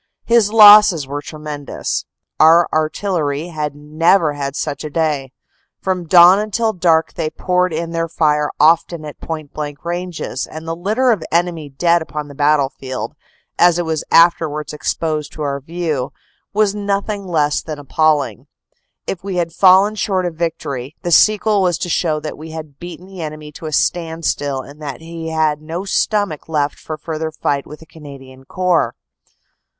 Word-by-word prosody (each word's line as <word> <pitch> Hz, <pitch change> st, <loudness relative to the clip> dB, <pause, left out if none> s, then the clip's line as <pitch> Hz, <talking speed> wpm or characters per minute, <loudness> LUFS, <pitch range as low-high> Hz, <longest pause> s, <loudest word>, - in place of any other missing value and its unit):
His 230 Hz, -3 st, +3 dB
losses 210 Hz, -7 st, +8 dB
were 145 Hz, +2 st, -5 dB
tremendous. 150 Hz, -1 st, -5 dB, 0.3 s
Our 165 Hz, +2 st, +6 dB
artil 155 Hz, +6 st, -1 dB
lery 150 Hz, +2 st, -2 dB
had 150 Hz, -3 st, -4 dB
never 155 Hz, +2 st, +2 dB
had 140 Hz, -1 st, -4 dB
such 145 Hz, -1 st, -3 dB
a 150 Hz, -, -5 dB
day. 150 Hz, -4 st, -1 dB, 0.5 s
From 185 Hz, -3 st, -2 dB
dawn 180 Hz, +3 st, +7 dB
until 220 Hz, +1 st, -1 dB
dark 165 Hz, -3 st, +2 dB
they 160 Hz, -2 st, -2 dB
poured 180 Hz, +2 st, 0 dB
in 165 Hz, +1 st, -3 dB
their 165 Hz, 0 st, -1 dB
fire 150 Hz, -2 st, +1 dB
often 160 Hz, +1 st, +3 dB
at 150 Hz, -, -10 dB
point 155 Hz, -3 st, -6 dB
blank 145 Hz, 0 st, -6 dB
ranges, 175 Hz, -6 st, -4 dB
and 160 Hz, +1 st, -9 dB
the 165 Hz, -, -2 dB
litter 215 Hz, +9 st, +1 dB
of 210 Hz, -8 st, -1 dB
enemy 170 Hz, -3 st, 0 dB
dead 170 Hz, +5 st, +2 dB
upon 150 Hz, -2 st, -5 dB
the -, -, -10 dB
battlefield, 140 Hz, -3 st, -1 dB, 0.5 s
as 175 Hz, -1 st, +5 dB
it 175 Hz, -, -1 dB
was 160 Hz, -1 st, -2 dB
afterwards 160 Hz, -3 st, +3 dB
ex 150 Hz, -, -1 dB
posed 155 Hz, -2 st, -3 dB
to 155 Hz, -, -5 dB
our 140 Hz, -1 st, -2 dB
view, 155 Hz, -3 st, -3 dB, 0.4 s
was 210 Hz, -1 st, +2 dB
nothing 200 Hz, 0 st, -2 dB
less 150 Hz, -4 st, +1 dB
than 155 Hz, -2 st, -6 dB
appalling. 145 Hz, -, 0 dB, 0.6 s
If 185 Hz, -, -5 dB
we 195 Hz, -1 st, -4 dB
had 170 Hz, -2 st, -1 dB
fallen 190 Hz, +3 st, +5 dB
short 190 Hz, -3 st, -1 dB
of 175 Hz, -, -2 dB
victory, 150 Hz, -5 st, -4 dB
the 175 Hz, -, -2 dB
sequel 210 Hz, +2 st, +4 dB
was 180 Hz, -3 st, +1 dB
to 175 Hz, -, -4 dB
show 155 Hz, -2 st, 0 dB
that 155 Hz, -, -6 dB
we 160 Hz, +1 st, -9 dB
had 155 Hz, -3 st, -9 dB
beaten 175 Hz, +1 st, -9 dB
the 190 Hz, -2 st, -10 dB
enemy 155 Hz, -1 st, -7 dB
to 155 Hz, +2 st, -8 dB
a -, -, -5 dB
standstill 160 Hz, -4 st, -1 dB
and 145 Hz, +3 st, -14 dB
that 140 Hz, -1 st, -6 dB
he 165 Hz, 0 st, -7 dB
had 155 Hz, -2 st, 0 dB
no 165 Hz, +5 st, -5 dB
stomach 200 Hz, -6 st, -1 dB
left 145 Hz, -2 st, -1 dB
for 155 Hz, -, -6 dB
further 160 Hz, 0 st, -4 dB
fight 140 Hz, -2 st, -2 dB
with 150 Hz, -, -11 dB
the -, -, -13 dB
Canadian 135 Hz, -4 st, -13 dB
Corps. 180 Hz, +2 st, 0 dB
160 Hz, 170 wpm, -18 LUFS, 150-180 Hz, 0.6 s, losses